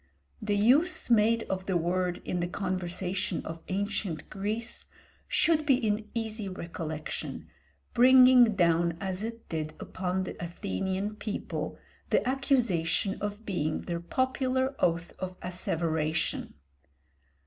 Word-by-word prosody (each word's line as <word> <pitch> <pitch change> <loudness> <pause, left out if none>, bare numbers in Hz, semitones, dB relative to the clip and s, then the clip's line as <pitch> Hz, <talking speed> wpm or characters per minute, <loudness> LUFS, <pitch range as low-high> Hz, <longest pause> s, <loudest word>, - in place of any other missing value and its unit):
The 210 -1 0
use 260 - +4
made 230 +1 +4
of 190 0 -4
the 190 -2 +2
word 175 +1 -1
in 180 - -1
the 175 - 0
conversation 185 0 -2
of 165 0 -6
ancient 195 -4 -2
Greece 215 +4 -2 0.4
should 320 -2 +3
be 280 -3 +5
in 215 -3 -1
easy 220 -3 -2
recollection, 165 -4 -5 0.5
bringing 250 -2 +7
down 170 -2 +3
as 190 0 -3
it 230 +1 -6
did 155 -1 -3
upon 185 0 -2
the 180 - -6
Athenian 185 - -3
people 210 -1 -4 0.3
the - - +2
accusation 240 - +1
of 205 +2 -4
being 155 -6 -1
their 170 -1 -3
popular 260 +6 0
oath 170 0 +1
of 185 -1 -5
asseveration. 160 -3 -1
190 Hz, 120 wpm, -29 LUFS, 175-225 Hz, 0.5 s, bringing